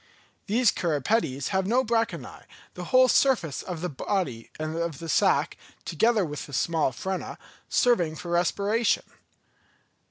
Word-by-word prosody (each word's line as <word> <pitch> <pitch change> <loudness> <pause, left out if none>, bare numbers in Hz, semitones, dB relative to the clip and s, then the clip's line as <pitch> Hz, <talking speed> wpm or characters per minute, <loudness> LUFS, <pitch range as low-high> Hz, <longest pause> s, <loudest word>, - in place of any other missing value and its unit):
These 230 +1 +3
cirripedes 145 - -1
have 190 0 0
no 250 +4 +2
branchiæ, 230 0 -2 0.3
the - - -7
whole 255 0 +5
surface 235 - +2
of 175 -3 -6
the 180 - -2
body 135 - -3
and 155 +1 -3
of 170 -3 -3
the 165 - -8
sack, 155 - +2 0.3
together 215 +4 +2
with 150 -2 -6
the 145 - -12
small 160 +1 +1
frena, 190 +8 -5 0.3
serving 175 -11 +2
for 170 +2 -7
respiration. 200 +6 +1
180 Hz, 135 wpm, -26 LUFS, 155-225 Hz, 0.3 s, whole